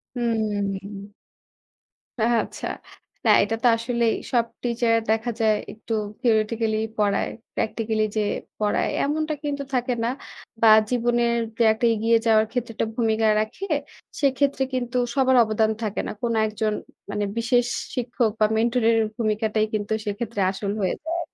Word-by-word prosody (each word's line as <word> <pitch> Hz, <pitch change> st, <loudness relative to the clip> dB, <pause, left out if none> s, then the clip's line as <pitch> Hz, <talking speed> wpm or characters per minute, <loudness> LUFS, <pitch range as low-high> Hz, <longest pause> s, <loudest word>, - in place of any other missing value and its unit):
হুম। 205 Hz, -3 st, -2 dB, 1.1 s
আ -, -, +3 dB, 0.2 s
আচ্ছা। -, -, -6 dB, 0.6 s
না -, -, +4 dB
এটা 215 Hz, +3 st, -1 dB
তো -, -, +6 dB
আসলেই 235 Hz, 0 st, 0 dB, 0.2 s
সব 235 Hz, -2 st, +3 dB, 0.2 s
টিচার 235 Hz, -1 st, +1 dB
দেখা 225 Hz, +2 st, +1 dB
যায় 215 Hz, -1 st, +4 dB, 0.2 s
একটু 220 Hz, +1 st, -6 dB, 0.3 s
থিওরেটিক্যালিই 220 Hz, -2 st, +1 dB
পড়ায়। 205 Hz, -2 st, +1 dB, 0.2 s
প্র্যাকটিক্যালি 220 Hz, 0 st, -1 dB
যে -, -, +3 dB, 0.4 s
পড়ায় 210 Hz, -1 st, +1 dB
এমনটা 310 Hz, +2 st, 0 dB
কিন্তু 285 Hz, -1 st, -2 dB
থাকে 250 Hz, 0 st, +1 dB
না 230 Hz, -, +1 dB, 0.5 s
বা 225 Hz, -, +6 dB, 0.2 s
জীবনের 240 Hz, -1 st, +1 dB, 0.2 s
যে 235 Hz, -, +3 dB
একটা 220 Hz, +2 st, -1 dB
এগিয়ে 225 Hz, +1 st, +3 dB
যাওয়ার 220 Hz, -1 st, +5 dB
ক্ষেত্রে 245 Hz, -2 st, -3 dB
একটা -, -, -1 dB
ভূমিকা 225 Hz, -2 st, +2 dB
রাখে, 215 Hz, -, -3 dB, 0.6 s
সেক্ষেত্রে 275 Hz, 0 st, +2 dB
কিন্তু 250 Hz, -1 st, -1 dB, 0.2 s
সবার 260 Hz, -1 st, +4 dB
অবদান 220 Hz, 0 st, +1 dB
থাকে 210 Hz, -2 st, -2 dB
না। -, -, -3 dB
কোনো 235 Hz, -1 st, 0 dB
একজন 215 Hz, 0 st, -1 dB, 0.4 s
মানে 205 Hz, 0 st, -1 dB
বিশেষ 240 Hz, +1 st, +2 dB, 0.3 s
শিক্ষক 240 Hz, -2 st, 0 dB
বা 215 Hz, -, +5 dB
মেন্টরের 230 Hz, 0 st, +3 dB, 0.2 s
ভূমিকাটাই 215 Hz, -1 st, +1 dB
কিন্তু 210 Hz, 0 st, -1 dB
সেক্ষেত্রে 205 Hz, +1 st, -3 dB
আসল 200 Hz, +1 st, -3 dB
হয়ে 190 Hz, -, +1 dB
যায় 325 Hz, +2 st, -3 dB
আরকি। -, -, -10 dB
225 Hz, 145 wpm, -24 LUFS, 215-240 Hz, 1.1 s, তো